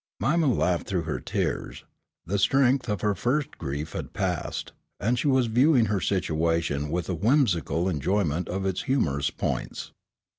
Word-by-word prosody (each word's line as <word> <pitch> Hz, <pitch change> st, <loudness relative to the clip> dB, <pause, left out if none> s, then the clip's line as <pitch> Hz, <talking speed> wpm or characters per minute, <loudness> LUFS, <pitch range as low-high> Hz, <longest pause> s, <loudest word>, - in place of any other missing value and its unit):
Mima 155 Hz, -, +2 dB
laughed 90 Hz, -8 st, +1 dB
through 90 Hz, -4 st, -1 dB
her 80 Hz, -1 st, -3 dB
tears. -, -, -3 dB, 0.4 s
The 100 Hz, +4 st, -1 dB
strength 130 Hz, +2 st, +3 dB
of 105 Hz, -, -1 dB
her 105 Hz, -1 st, +2 dB
first 135 Hz, +7 st, -1 dB
grief 75 Hz, +1 st, -4 dB
had -, -, -6 dB
passed, -, -, -2 dB, 0.3 s
and 115 Hz, +4 st, +1 dB
she -, -, 0 dB
was 130 Hz, -2 st, +4 dB
viewing 125 Hz, +2 st, +4 dB
her 100 Hz, -, 0 dB
situation 80 Hz, -4 st, 0 dB
with 85 Hz, 0 st, -2 dB
a 95 Hz, -, -1 dB
whimsical 95 Hz, -, +2 dB
enjoyment 90 Hz, 0 st, 0 dB
of 95 Hz, +2 st, -2 dB
its 95 Hz, -1 st, -1 dB
humorous 75 Hz, -, 0 dB
points. -, -, -4 dB
95 Hz, 155 wpm, -26 LUFS, 85-125 Hz, 0.4 s, was